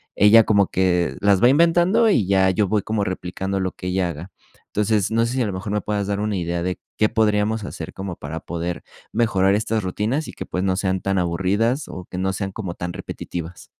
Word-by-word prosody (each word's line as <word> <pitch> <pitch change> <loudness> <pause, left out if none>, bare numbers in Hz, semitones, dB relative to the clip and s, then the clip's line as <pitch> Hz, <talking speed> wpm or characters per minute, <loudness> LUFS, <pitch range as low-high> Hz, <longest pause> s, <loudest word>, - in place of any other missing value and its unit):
ella 110 +2 +7
como 100 -3 +3
que 90 -2 +1
las 100 0 +3
va 120 - +8
inventando, 175 - +4
y 110 - +3
ya 95 0 +3
yo 95 +1 +1
voy 105 -2 +2
como 110 -2 -1
replicando 95 +1 -3
lo 95 -1 -2
que 90 - -7
ella 90 0 0
haga. 85 +4 -8 0.4
Entonces, 105 -1 0
no 115 +1 +2
sé 120 - -3
si 130 - 0
a - - +2
lo 100 - -2
mejor 100 +3 -4
me 105 - 0
puedas 105 -2 -2
dar 100 0 -1
una 105 -2 -1
idea 85 0 -2
de, 90 0 -2 0.2
¿qué 110 - +3
podríamos 105 0 +1
hacer 80 -4 -7
como 95 -2 -5
para 80 +2 -6
poder 85 +1 -4 0.3
mejorar 100 -4 +2
estas 110 +1 0
rutinas 110 - -2
y - - -9
que, - - -7
pues, 90 - -3
no 95 -1 +1
sean 95 -2 0
tan 95 0 0
aburrida,s 95 - 0
o 90 -1 -8
que 90 - -6
no 95 +1 0
sean 95 0 -4
como 95 -5 -5
tan 85 0 -5
repetitivas? 85 0 -7
95 Hz, 225 wpm, -22 LUFS, 90-110 Hz, 0.4 s, va